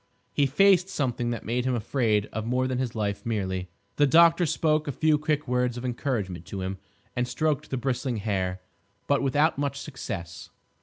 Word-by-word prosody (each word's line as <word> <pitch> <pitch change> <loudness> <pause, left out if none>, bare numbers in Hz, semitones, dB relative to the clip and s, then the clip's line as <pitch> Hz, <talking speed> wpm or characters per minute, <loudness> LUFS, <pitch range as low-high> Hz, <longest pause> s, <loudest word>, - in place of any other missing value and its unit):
He 140 - +3
faced 185 +5 +4
something 125 -8 -1
that 120 -1 -4
made 120 +3 0
him 130 0 0
afraid 110 -3 +1
of 110 - -2
more 125 +3 0
than 130 -1 -2
his 125 -3 -2
life 100 -2 -2
merely. 95 -6 -2 0.3
The 145 - +5
doctor 170 +3 +6
spoke 155 0 +1
a - - 0
few 155 +2 +2
quick 150 -1 -1
words 125 -1 0
of 120 - -5
encouragement 115 -8 -3
to 95 - -5
him, 95 0 -4 0.4
and 125 0 0
stroked 150 +4 -1
the 130 - -2
bristling 125 -1 -1
hair. 95 -3 -2 0.4
But 140 -1 +2
without 145 +3 +2
much 140 -1 -1
success. 85 - -6
125 Hz, 185 wpm, -27 LUFS, 110-145 Hz, 0.4 s, doctor